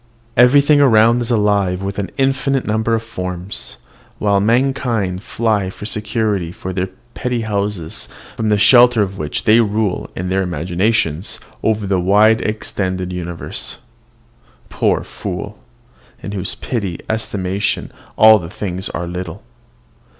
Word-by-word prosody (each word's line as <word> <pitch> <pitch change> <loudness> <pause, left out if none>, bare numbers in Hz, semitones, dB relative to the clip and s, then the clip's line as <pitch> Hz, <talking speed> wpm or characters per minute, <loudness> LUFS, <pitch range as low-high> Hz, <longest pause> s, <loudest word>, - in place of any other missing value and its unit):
Everything 140 +4 +5
around 115 -2 +5
is 120 - -3
alive 100 -4 +1
with 100 +1 -3
an 100 - -3
infinite 135 0 +1
number 110 +2 +1
of 115 - -3
forms; 90 -4 -6 0.4
while 100 -1 +2
mankind 115 -4 +1
fly 110 -4 0
for 100 - -9
security 105 -4 -1
to 95 +1 -6
their 90 0 -2 0.2
petty 125 -2 -2
houses, 100 -6 -3 0.3
from 110 -1 -1
the 105 - +3
shelter 120 +1 +6
of 95 0 -5
which 75 -1 -3
they 110 +2 +5
rule 105 -3 -1
in 90 +1 -3
their 95 +1 +1
imaginations 90 +1 -1 0.2
over 110 -2 0
the 95 -1 +1
wide 105 +5 +4
extended 95 -4 -2
universe. 85 -2 -4 0.9
Poor - - +1
fool! 100 +2 -6 0.6
in 100 - -5
whose 95 -2 -3
petty 100 -9 -3
estimation 100 -3 -2 0.3
all 110 0 +8
things 95 -1 -3
are 85 - -4
little. 90 +1 -6
105 Hz, 130 wpm, -18 LUFS, 95-110 Hz, 0.9 s, all